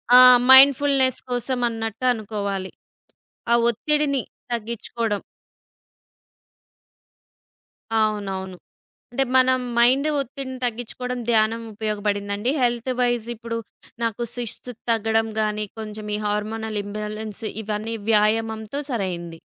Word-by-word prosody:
ఆ! 250 Hz, -, +11 dB, 0.3 s
మైండ్‌ఫుల్‌నెస్ 270 Hz, -1 st, +6 dB
కోసం 245 Hz, +1 st, -1 dB
అన్నట్టు 225 Hz, +1 st, -4 dB
అనుకోవాలి. 200 Hz, -4 st, -4 dB, 0.8 s
ఆ -, -, +6 dB, 0.2 s
ఒత్తిడిని 285 Hz, +2 st, +1 dB, 0.3 s
తగ్గించుకోడం. 230 Hz, -2 st, -2 dB, 2.8 s
అవునవును. 195 Hz, -3 st, -2 dB, 0.6 s
అంటే 270 Hz, +2 st, +1 dB
మనం 255 Hz, 0 st, +5 dB, 0.2 s
మైండ్ 260 Hz, +5 st, +4 dB
ఒత్తిడిని 265 Hz, 0 st, -5 dB
తగ్గించుకోవడం 245 Hz, +1 st, -3 dB
ధ్యానం 225 Hz, 0 st, +2 dB
ఉపయోగపడిందండి. 205 Hz, +1 st, -1 dB
హెల్త్ 240 Hz, +1 st, +1 dB
వైస్ 240 Hz, -2 st, +1 dB
ఇప్పుడు 230 Hz, 0 st, -5 dB, 0.5 s
నాకు 230 Hz, 0 st, -1 dB
సిస్ట్ 245 Hz, +1 st, -5 dB, 0.2 s
తగ్గడం 225 Hz, 0 st, +1 dB
గాని, 210 Hz, 0 st, -1 dB
కొంచెం 215 Hz, -1 st, -7 dB
ఈ 210 Hz, -, -3 dB
హార్మోనల్ 215 Hz, +1 st, -2 dB
ఇంబాలెన్స్ 215 Hz, +1 st, -6 dB, 0.2 s
ఇవన్నీ 215 Hz, +2 st, -3 dB, 0.2 s
వ్యాయామంతో 220 Hz, +4 st, +1 dB
సరైంది. 175 Hz, -7 st, -3 dB
225 Hz, 90 wpm, -23 LUFS, 210-245 Hz, 2.8 s, ఆ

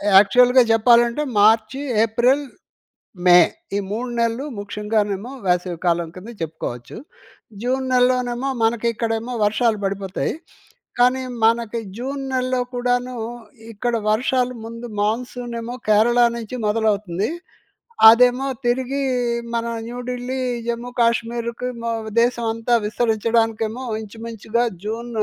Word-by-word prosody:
యాక్చువల్‌గా 250 Hz, +6 st, +6 dB
చెప్పాలంటే 235 Hz, +4 st, +4 dB, 0.2 s
మార్చి, 220 Hz, +5 st, +3 dB, 0.2 s
ఏప్రిల్, 245 Hz, +6 st, +2 dB, 0.8 s
మే. 180 Hz, 0 st, +8 dB, 0.4 s
ఈ -, -, +1 dB
3 240 Hz, +4 st, -3 dB
నెలలు 230 Hz, +4 st, 0 dB
ముఖ్యంగానేమో 210 Hz, +1 st, -2 dB, 0.2 s
వేసవి 180 Hz, -1 st, 0 dB
కాలం 170 Hz, -1 st, +1 dB
కింద 200 Hz, +5 st, -9 dB
చెప్పుకోవచ్చు. 150 Hz, -7 st, -6 dB, 0.7 s
జూన్ 260 Hz, +2 st, 0 dB
నెలలోనేమో 250 Hz, +1 st, +1 dB
మనకి 230 Hz, +1 st, +1 dB
ఇక్కడేమో 230 Hz, +2 st, -2 dB
వర్షాలు 220 Hz, +1 st, +1 dB
పడిపోతాయి. 195 Hz, -1 st, -2 dB, 0.7 s
కానీ 250 Hz, +2 st, +4 dB, 0.2 s
మనకి 230 Hz, 0 st, +2 dB, 0.2 s
జూన్ 270 Hz, +3 st, -4 dB
నెలలో 255 Hz, 0 st, 0 dB
కూడాను 245 Hz, 0 st, -1 dB, 0.6 s
ఇక్కడ 235 Hz, +3 st, -2 dB, 0.2 s
వర్షాలు 250 Hz, +2 st, 0 dB
ముందు 230 Hz, +1 st, -7 dB
మాన్‌సూన్ 240 Hz, +3 st, -2 dB
ఏమో 240 Hz, +2 st, -6 dB, 0.2 s
కేరళ 225 Hz, +3 st, +4 dB, 0.2 s
నుంచి 230 Hz, +2 st, -6 dB
మొదలవుతుంది. 210 Hz, -2 st, 0 dB, 0.8 s
అదేమో 250 Hz, +3 st, +5 dB, 0.2 s
తిరిగి 260 Hz, +3 st, 0 dB, 0.5 s
మన 230 Hz, 0 st, -1 dB, 0.2 s
న్యూ‌ఢిల్లీ, 250 Hz, +1 st, -4 dB, 0.3 s
జమ్మూ‌కాశ్మీర్‌కి 235 Hz, 0 st, -1 dB
మో 230 Hz, -, -2 dB, 0.3 s
దేశమంతా 235 Hz, -1 st, 0 dB
విస్తరించడానికేమో 225 Hz, +1 st, 0 dB, 0.2 s
ఇంచుమించుగా 225 Hz, +1 st, -3 dB, 0.2 s
జూన్ 225 Hz, +3 st, -4 dB
235 Hz, 100 wpm, -21 LUFS, 215-245 Hz, 0.8 s, మే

